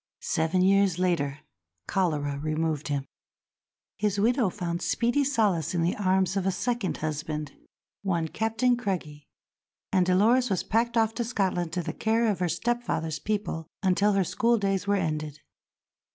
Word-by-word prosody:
Seven 165 Hz, +3 st, +1 dB
years 195 Hz, -2 st, +4 dB
later 165 Hz, -6 st, 0 dB, 0.4 s
cholera 150 Hz, -7 st, 0 dB
removed 155 Hz, 0 st, -1 dB
him; 140 Hz, -2 st, -2 dB, 0.9 s
his 205 Hz, -1 st, 0 dB
widow 235 Hz, 0 st, +3 dB
found 175 Hz, -2 st, -4 dB
speedy 240 Hz, +4 st, +1 dB
solace 210 Hz, -, +1 dB
in 170 Hz, -, +1 dB
the 170 Hz, -, +1 dB
arms 190 Hz, -1 st, +1 dB
of 195 Hz, -1 st, 0 dB
a -, -, +3 dB
second 235 Hz, +2 st, -2 dB
husband, 150 Hz, -1 st, -3 dB, 0.5 s
one 170 Hz, -5 st, 0 dB
Captain 225 Hz, +6 st, +1 dB
Craigie; 175 Hz, -, -4 dB, 0.6 s
and 185 Hz, -2 st, +4 dB
Dolores 225 Hz, +7 st, +4 dB
was 190 Hz, -3 st, 0 dB
packed 235 Hz, +1 st, 0 dB
off 225 Hz, -1 st, +3 dB
to 240 Hz, -, -2 dB
Scotland 190 Hz, -7 st, -1 dB
to 180 Hz, -, -1 dB
the -, -, -4 dB
care 225 Hz, +1 st, +1 dB
of 190 Hz, -, -4 dB
her 180 Hz, -1 st, 0 dB
stepfather's 175 Hz, -5 st, -1 dB
people 205 Hz, -7 st, -3 dB, 0.2 s
until 200 Hz, +2 st, +3 dB
her 195 Hz, -1 st, +3 dB
schooldays 200 Hz, -2 st, +1 dB
were 205 Hz, -, +3 dB
ended. 155 Hz, -5 st, -2 dB
190 Hz, 150 wpm, -27 LUFS, 160-220 Hz, 0.9 s, years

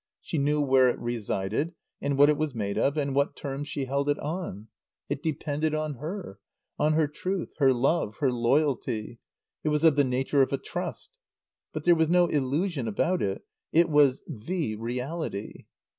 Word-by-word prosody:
She 160 Hz, -, -3 dB
knew 150 Hz, +2 st, +2 dB
where 130 Hz, -2 st, +5 dB
it -, -, -1 dB
resided, 120 Hz, -, -2 dB, 0.3 s
and 140 Hz, -1 st, 0 dB
what 145 Hz, +1 st, +7 dB
it 150 Hz, -, +4 dB
was 150 Hz, -3 st, -2 dB
made 100 Hz, -3 st, -2 dB
of, 145 Hz, +2 st, +1 dB
and 140 Hz, -2 st, 0 dB
what 140 Hz, +1 st, +1 dB
terms 140 Hz, 0 st, -5 dB
she 140 Hz, -2 st, -3 dB
held 140 Hz, +2 st, -1 dB
it 145 Hz, -, +2 dB
on. 150 Hz, -, -5 dB, 0.4 s
It -, -, -2 dB
depended 155 Hz, 0 st, -1 dB
on 155 Hz, -3 st, -2 dB
her; 155 Hz, -, -6 dB, 0.4 s
on 150 Hz, +1 st, +3 dB
her 155 Hz, -1 st, +3 dB
truth, 185 Hz, +5 st, -4 dB
her 135 Hz, -2 st, +6 dB
love, 130 Hz, -3 st, +1 dB
her 135 Hz, -3 st, +2 dB
loyalty; 120 Hz, -3 st, 0 dB, 0.4 s
it 155 Hz, -, +1 dB
was 150 Hz, +1 st, +1 dB
of 160 Hz, -3 st, +5 dB
the 145 Hz, -, +6 dB
nature 135 Hz, +2 st, +1 dB
of 135 Hz, -, +2 dB
a 140 Hz, -, +1 dB
trust. -, -, -5 dB, 0.6 s
But 155 Hz, -, -5 dB
there 175 Hz, -, +6 dB
was 160 Hz, -1 st, +2 dB
no 175 Hz, 0 st, +5 dB
illusion 145 Hz, -1 st, 0 dB
about 175 Hz, -, 0 dB
it. 95 Hz, -1 st, -2 dB, 0.3 s
It 170 Hz, +1 st, +4 dB
was 145 Hz, -3 st, +4 dB
the 150 Hz, -, -3 dB
reality. 125 Hz, 0 st, -4 dB
145 Hz, 180 wpm, -27 LUFS, 125-155 Hz, 0.6 s, what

